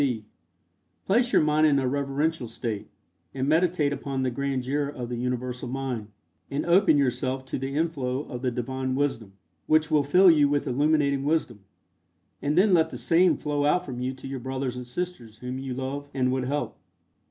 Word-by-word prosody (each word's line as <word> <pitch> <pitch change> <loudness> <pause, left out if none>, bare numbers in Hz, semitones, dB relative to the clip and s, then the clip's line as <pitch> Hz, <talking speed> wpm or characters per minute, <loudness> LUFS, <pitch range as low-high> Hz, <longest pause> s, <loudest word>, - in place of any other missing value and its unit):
(b) 120 -6 0 0.8
Place 240 +5 +2
your - - +4
mind 155 +1 +4
in 145 -2 +3
a 130 -2 +1
reverential 140 +1 -1
state, 110 -2 -4 0.5
and 135 0 -1
meditate 160 -2 +2
upon 135 -1 -3
the 130 - 0
grandeur 140 +2 -1
of 125 -4 -6
the 120 - -3
Universal 125 +1 -3
Mind, 125 -4 -3 0.4
and 140 - -2
open 175 -2 +5
yourself 130 -1 0
to 130 - -4
the 135 +1 -4
inflow 140 -5 -1
of 125 -5 -7
the 130 - +1
Divine 130 +2 -3
Wisdom, 130 -8 -2 0.3
which 155 0 +3
will 150 -1 +4
fill 180 +6 +6
you 145 -3 +4
with 145 0 0
illuminating 140 0 +2
wisdom, 145 -7 0 0.8
and 145 +3 0
then 195 +1 +5
let 165 -2 +4
the - - -7
same 175 +2 +3
flow 145 -1 -1
out 180 +5 +2
from 125 -3 -6
you 125 +1 -1
to 130 - -9
your 135 -1 -4
brothers 130 0 -3
and 125 -1 -7
sisters 125 -6 -5
whom 125 +2 -5
you 135 -2 -4
love 140 +2 -4
and 130 -1 +1
would 130 -1 -1
help. 130 -4 -2
135 Hz, 185 wpm, -26 LUFS, 125-150 Hz, 0.8 s, fill